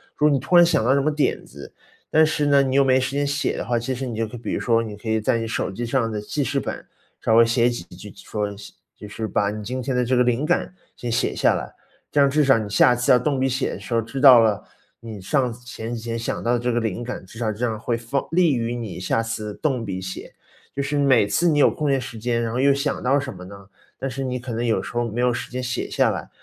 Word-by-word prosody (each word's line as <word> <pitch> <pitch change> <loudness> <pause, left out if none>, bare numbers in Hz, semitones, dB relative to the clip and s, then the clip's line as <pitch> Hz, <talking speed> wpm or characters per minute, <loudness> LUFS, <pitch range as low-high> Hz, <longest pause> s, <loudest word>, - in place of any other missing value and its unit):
如 150 - +1
果 - - +5
你 140 - +2
突 175 - 0
然 175 - +8
想 165 -8 +2
到 130 +4 +3
什 140 - +2
么 155 +3 +1
点 150 -1 -1
子， 70 +2 -12 0.4
但 160 0 +5
是 150 -1 0
呢， 140 -1 +5
你 130 -1 -1
又 140 - +5
没 130 -1 +3
时 130 0 -2
间 145 0 +1
写 145 0 -1
的 - - -3
话， 120 0 0
其 120 +3 -2
实 130 +1 -4
你 120 - -5
就 115 0 -1
可 110 - -10
比 120 - -5
如 - - -1
说， 115 -1 +2
你 110 -2 -6
可 110 - -11
以 110 0 +1
在 110 - +1
你 115 0 -3
手 110 - -2
机 120 +5 -4
上 115 -2 0
的 105 - -3
记 140 +8 -3
事 140 +1 -1
本， - - -5 0.4
稍 110 - +2
微 115 0 +7
写 115 +1 +2
几 120 -7 -5
句， 90 +4 -12
说， 105 +2 -4 0.5
就 105 - -10
是 110 +1 -4
把 100 0 0
你 105 0 -6
今 125 +5 -4
天 130 +1 -2
的 125 0 +1
这 130 +2 +1
个 125 - +4
灵 125 +3 0
感 175 +2 0 0.2
先 120 - -5
写 115 - 0
下 - - +3
来。 - - -5 0.4
这 145 - +3
样 140 - +5
至 150 +1 +2
少 135 -3 +5
你 110 -2 -4
下 120 +4 +4
次 120 0 +1
要 125 - +6
动 140 +3 0
笔 135 0 +1
写 130 +1 -1
的 - - -7
时 - - -6
候， 115 - +2
知 130 +4 -6
道 130 -4 +9
了， 105 -2 +2 0.4
你 110 -3 -8
上 125 +5 0
前 120 -1 -7
几 115 - -5
天 115 0 -4
想 115 - -3
到 120 - +1
的 120 - +1
这 125 +1 -1
个 120 - +1
灵 115 0 -3
感， 120 -5 -6
至 95 - -14
少 115 -2 -1
这 110 +4 -2
样 110 -2 -2
会 115 +2 -2
放 120 +4 -3
利 165 -4 +3
于 115 0 -2
你 115 -6 -6
下 95 +4 0
次 110 -2 -4
动 135 -6 -1
笔 95 -2 -4
写。 95 0 -7 0.4
就 140 - -2
是 140 +1 -2
每 135 -7 +4
次 170 +11 +1
你 150 -2 +2
有 - - +6
空 150 -2 -2
闲 135 -1 +2
时 125 -2 -7
间， 120 +1 -1
然 115 -1 -2
后 125 - -1
又 140 +1 +4
想 140 +1 -2
到 135 +3 +3
什 135 -1 -5
么 90 - -10
呢， 100 +1 -12 0.3
但 135 - -3
是 135 +1 -4
你 125 -1 -3
可 120 -1 -6
能 115 +2 -2
有 115 - +1
时 - - -8
候 120 0 0
没 115 +3 -5
有 125 0 +2
时 - - -5
间 130 +1 -3
写 120 -1 -3
下 - - +2
来， - - -6
120 Hz, 315 characters per minute, -22 LUFS, 115-135 Hz, 0.5 s, 道